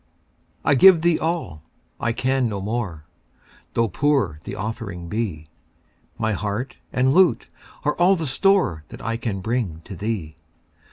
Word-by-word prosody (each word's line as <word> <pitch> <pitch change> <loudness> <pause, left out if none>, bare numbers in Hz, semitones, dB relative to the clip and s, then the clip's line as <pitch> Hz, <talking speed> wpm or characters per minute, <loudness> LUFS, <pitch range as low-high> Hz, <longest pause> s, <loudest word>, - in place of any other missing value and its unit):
I - - +5
give 170 +3 +7
thee 170 -1 +3
all 160 - -2 0.4
I 120 - 0
can 130 +1 +1
no 100 -2 -3
more 100 -7 -3 0.7
Tho' 115 0 +3
poor 110 - +1
the - - -5
offering 100 -5 -5
be; 95 -9 -3 0.7
My 110 - 0
heart 105 +6 -3
and 130 +1 +2
lute 185 +1 +4 0.4
are 150 - +2
all 180 +3 +5
the 165 -3 -3
store 145 - +2
That - - -10
I 115 0 -1
can 110 -5 -3
bring 110 -7 -2
to 100 - -8
thee. 95 -6 -4
115 Hz, 150 wpm, -23 LUFS, 95-140 Hz, 0.7 s, give